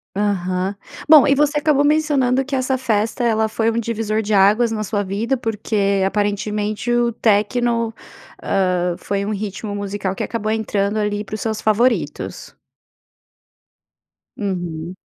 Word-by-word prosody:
Aham. 190 -1 -1 0.3
Bom, 305 -3 +9
e 275 - +5
você 295 +1 +2
acabou 295 -1 +2
mencionando 285 -4 +2
que 280 0 -3
essa 260 0 0
festa, 225 -1 -1
ela 220 -2 +2
foi 225 +1 0
um 230 - -1
divisor 220 -1 -1
de 215 0 -5
águas 210 +4 +4
na 215 -1 -2
sua 205 0 -1
vida, 210 +7 -1
porque 210 -4 0
aparentemente, 210 +2 -1
o 240 0 +2
techno, 230 +2 +1 0.5
hã, 180 -2 0
foi 200 0 -2
um 210 - -2
ritmo 205 +1 -5
musical 200 -1 -3
que - - -4
acabou 215 -2 -2
entrando 210 -1 -1
ali 210 -1 -1
para 210 - -12
os 215 - -4
seus 220 -1 -2
favoritos. 230 +3 0 1.8
Uhum. 175 -4 -4
215 Hz, 145 wpm, -20 LUFS, 200-235 Hz, 1.8 s, Bom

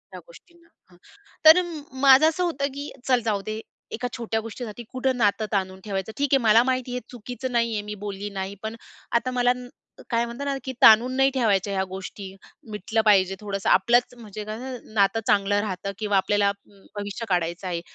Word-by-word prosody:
या - - -7
गोष्टींना 345 -8 -19
ना. - - -34 0.2
हां, 175 - -20 0.5
तर 320 +3 +9 0.4
माझं 275 +3 +7
असं 360 +3 -2
होतं, 280 -5 -1
की 285 +1 -5 0.2
चल 250 -2 +3
जाऊदे 215 0 -2 0.3
एका 245 +2 -3
छोट्या 225 -1 -2
गोष्टीसाठी 230 0 -7
कुठं 255 0 -1
नातं 215 -1 +2
ताणून 190 -2 -2
ठेवायचं. 195 +1 -3
ठीक 285 -1 0
आहे - - +7
मला 225 +2 +6
माहिती 255 -1 -1
आहे 250 - -3
चुकीचं 250 +2 -6
नाही 235 -1 +1
आहे, 210 - -1
मी 210 0 -6
बोलली 205 0 -5
नाहीये 195 0 -5
पण 220 +1 -4 0.4
आता 255 +2 +1
मला 245 0 +2
न 250 0 -9 0.4
काय 235 0 +2
म्हणतात 240 +4 -6
ना, 275 - 0
की 260 - -5
ताणून 235 +4 +7
नाही 270 0 +5
ठेवायच्या 205 -6 +1
ह्या 190 - 0
गोष्टी. 190 +1 -8 0.4
मिटलं 215 +2 -1
पाहिजे 195 -2 +4
थोडंसं 200 -2 -2
आपलंच. 240 +6 +3
म्हणजे 215 -2 -8
कसं 240 +1 -7
नातं 200 +2 +3
चांगलं 205 0 +3
राहतं 200 -1 -4
किंवा 205 -2 +1
आपल्याला 200 +1 +2 0.4
भविष्य 205 +3 -5
काढायचं 175 +1 -1
आहे. 170 -2 -3
220 Hz, 185 wpm, -24 LUFS, 200-250 Hz, 0.5 s, तर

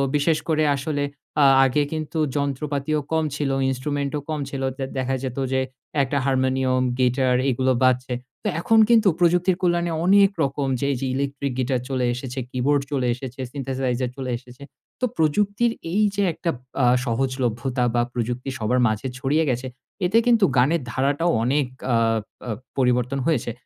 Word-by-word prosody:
বিশেষ 150 +2 +2
করে 155 -1 +2
আসলে 145 +1 -2 0.4
আ - - +6 0.2
আগে 135 +3 +2
কিন্তু 155 +1 -4 0.2
যন্ত্রপাতিও 145 +1 -1
কম 160 0 +2
ছিল, 145 -2 -1 0.2
instrument 140 +2 -2
ও - - -2
কম 155 -1 -2
ছিল। 135 -1 -5 0.2
তে 135 - -3
দেখা 130 0 0
যেত 130 -1 -4 0.2
যে 130 - +2 0.4
একটা 135 +2 -1
হারমোনিয়াম, 130 -1 +1 0.2
গিটার 125 0 +2
এগুলো 130 +1 +1
বাজছে। 125 0 +2 0.3
তো - - -1
এখন 225 +5 +4
কিন্তু 225 -3 +5
প্রযুক্তির 180 +1 +3
কল্যাণে 175 -1 +1
অনেক 200 +1 +6
রকম 140 0 -1
যে, - - -1
এই - - -3
যে - - -1
ইলেকট্রিক 140 0 -2
গিটার 130 -1 0
চলে 130 -2 0
এসেছে, 125 +1 -5
keyboard 135 +3 +1
চলে 130 -3 0
এসেছে, 130 0 -9
সিন্থেসাইজার 130 -2 -2
চলে 130 -2 -3
এসেছে। 125 +3 -14 0.4
তো - - +3
প্রযুক্তির 205 +9 +2 0.2
এই 210 +4 +2
যে 200 - +1
একটা 170 - -3 0.3
আ - - +5 0.2
সহজলভ্যতা 125 0 -1
বা 120 - +3
প্রযুক্তি 120 +2 -3
সবার 115 +4 +1
মাঝে 110 +4 -2
ছড়িয়ে 145 +5 +1
গেছে 125 +1 -1 0.4
এতে 195 +6 +3
কিন্তু 230 -4 +5
গানের 145 +6 +3
ধারাটাও 140 +7 +1
অনেক 140 +2 +1 0.3
আ - - +4 0.5
আ - - -4 0.3
পরিবর্তন 125 +1 +1
হয়েছে। 135 -7 0
135 Hz, 160 wpm, -23 LUFS, 130-155 Hz, 0.5 s, আ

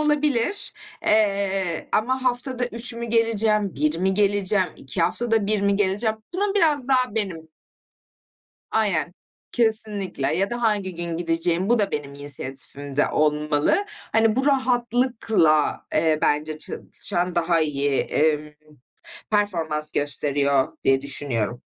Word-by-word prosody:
olabilir, 295 - 0 0.3
eee, 195 -5 +1
ama 255 +4 +1
haftada 245 0 0
3 235 0 -4
mü 235 0 -5
geleceğim, 220 -3 +1
1 150 +3 0
mi 190 +1 +1
geleceğim, 200 -2 +2
2 165 +6 -2
haftada 225 +1 0
1 210 -1 +1
mi 200 0 +2
geleceğim, 210 +3 0 0.2
bunun 405 +1 0
biraz 295 -8 +2
daha 255 -5 +2
benim 180 -7 -2 1.2
Aynen, 185 -6 0 0.4
kesinlikle, 210 - +1
ya 195 +3 0
da 240 0 -4
hangi 205 -5 0
gün 170 -1 -4
gideceğim, 170 +2 0
bu 240 -1 +3
da 200 -2 +1
benim 145 -1 -4
inisiyatifimde 140 0 -2
olmalı. 150 - +1 0.3
Hani, 225 0 +3
bu 265 +2 +1
rahatlıkla, 240 - +1
eee, 155 -1 +2
bence 155 +1 0
çalışan 175 +3 -3
daha 170 -1 +2
iyi, 145 -2 +1
emm, 150 0 0 0.8
performans 165 -8 -1
gösteriyor 140 -1 0
diye 135 0 +3
düşünüyorum. 125 -5 -2
195 Hz, 120 wpm, -23 LUFS, 155-230 Hz, 1.2 s, bu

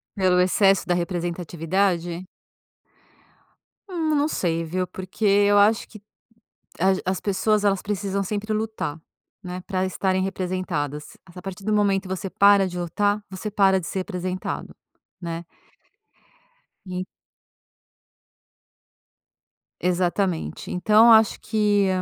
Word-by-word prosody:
Pelo 185 -3 +3
excesso 195 +1 +3
da 180 - +1
representatividade? 175 0 -1 1.6
Hum, 320 -4 0
não 290 +1 +2
sei 165 - -1
viu 180 +3 -2
porque 190 +4 -5
eu 205 0 +4
acho 215 +3 +4
que 215 - -13 0.8
as 190 +2 +3
as 185 0 -1
pessoas 210 +1 +1
elas 195 -2 +2
precisam 200 -1 -2
sempre 210 +2 -3
lutar, 215 -8 -3 0.4
né, 180 0 -6
pra 185 -1 -1
estarem 190 0 0
representadas, 180 -6 -3
a 180 0 -12
partir 195 +1 -8
do 215 +1 0
momento 200 -2 +2
você 190 +1 -4
para 200 0 +5
de 180 0 -6
lutar 205 +4 0
você 190 +3 -5
para 195 -2 +4
de 170 - -7
ser 190 - -3
representado, 185 -1 -4 0.5
né. 170 0 -5 1.4
E 185 0 -4 2.8
Exatamente. 180 0 -1
Então 215 +6 +5
acho 220 -1 +5
que 205 -2 +2
190 Hz, 115 wpm, -24 LUFS, 180-205 Hz, 2.8 s, para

